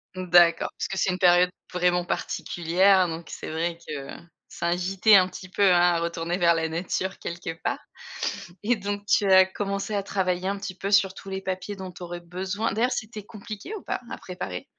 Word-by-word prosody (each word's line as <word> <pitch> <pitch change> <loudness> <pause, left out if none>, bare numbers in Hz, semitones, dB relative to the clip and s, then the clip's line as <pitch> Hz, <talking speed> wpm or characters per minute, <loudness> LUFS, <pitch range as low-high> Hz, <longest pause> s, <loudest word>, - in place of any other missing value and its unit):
Mmh, 185 -1 -5
d'accord. 170 -1 +5
Parce - - -2
que 195 - -5
c'est 190 - +2
une 180 - -3
période 180 -1 +5 0.2
vraiment 180 0 +2
particulière, 180 +3 +2
donc, 165 0 -6
c'est - - -7
vrai 165 +1 -2
que, 140 -2 -6 0.4
ça - - -5
invitait 185 +4 +2
un 185 -2 +6
petit 185 0 -9
peu, 185 - -5
hein, 180 -2 +6
à 175 -1 +4
retourner 170 +1 -2
vers 170 -2 +5
la 160 0 0
nature, 185 +3 -3
quelque 170 -1 -5
part. - - -1 0.8
Et, 235 +4 +2
donc, 205 0 -4
tu 205 - +3
as 190 0 +8
commencé 200 +2 -3
à 200 - 0
travailler 185 -1 -1
un 200 - -2
petit 195 -2 -6
peu 200 +2 -3
sur 195 -2 +4
tous 195 - -10
les 190 0 -4
papiers 190 +2 -4
dont 190 -1 -7
tu 180 - -10
aurais 175 0 -6
besoin 190 +5 -3
d'ailleurs, 235 +5 +1
c'était 220 -3 -4
compliqué 215 - -8
ou 410 - -7
pas - - -3
à - - -4
préparer? 95 - -6
185 Hz, 205 wpm, -25 LUFS, 175-200 Hz, 0.8 s, as